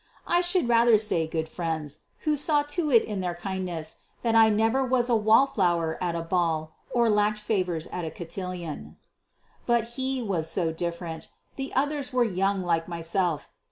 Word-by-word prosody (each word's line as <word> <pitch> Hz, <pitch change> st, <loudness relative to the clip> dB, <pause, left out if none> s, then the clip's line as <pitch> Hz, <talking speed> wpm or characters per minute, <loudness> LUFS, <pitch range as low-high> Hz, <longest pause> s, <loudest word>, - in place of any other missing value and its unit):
I 350 Hz, 0 st, +3 dB
should 350 Hz, -5 st, +1 dB
rather 235 Hz, -1 st, +5 dB
say 190 Hz, -7 st, 0 dB
good 160 Hz, 0 st, -2 dB
friends, 160 Hz, -4 st, -4 dB, 0.2 s
who 305 Hz, -1 st, +1 dB
saw 295 Hz, 0 st, +2 dB
to 305 Hz, +2 st, -2 dB
it 235 Hz, -5 st, +6 dB
in 205 Hz, -3 st, -3 dB
their 175 Hz, -1 st, -2 dB
kindness 175 Hz, -3 st, -4 dB, 0.3 s
that 230 Hz, -2 st, +1 dB
I 225 Hz, -1 st, +7 dB
never 225 Hz, +5 st, +2 dB
was 255 Hz, -1 st, +1 dB
a -, -, +5 dB
wall 220 Hz, +4 st, +5 dB
flower 175 Hz, -9 st, 0 dB
at 175 Hz, -1 st, -1 dB
a 165 Hz, -, -2 dB
ball, 165 Hz, -2 st, 0 dB, 0.2 s
or 235 Hz, -1 st, +2 dB
lacked 210 Hz, 0 st, +2 dB
favors 185 Hz, -6 st, -1 dB
at 180 Hz, -, -4 dB
a 160 Hz, -, -3 dB
cotillon. 175 Hz, -1 st, -6 dB, 0.7 s
But 235 Hz, -1 st, +2 dB
he 260 Hz, +2 st, -2 dB
was 175 Hz, -7 st, -1 dB
so 165 Hz, -1 st, +1 dB
different. 170 Hz, 0 st, -4 dB, 0.3 s
The 270 Hz, 0 st, -5 dB
others 285 Hz, 0 st, 0 dB
were 250 Hz, -1 st, +3 dB
young 195 Hz, -2 st, 0 dB
like 165 Hz, -2 st, 0 dB
myself. 170 Hz, -1 st, -1 dB
195 Hz, 175 wpm, -27 LUFS, 170-240 Hz, 0.7 s, I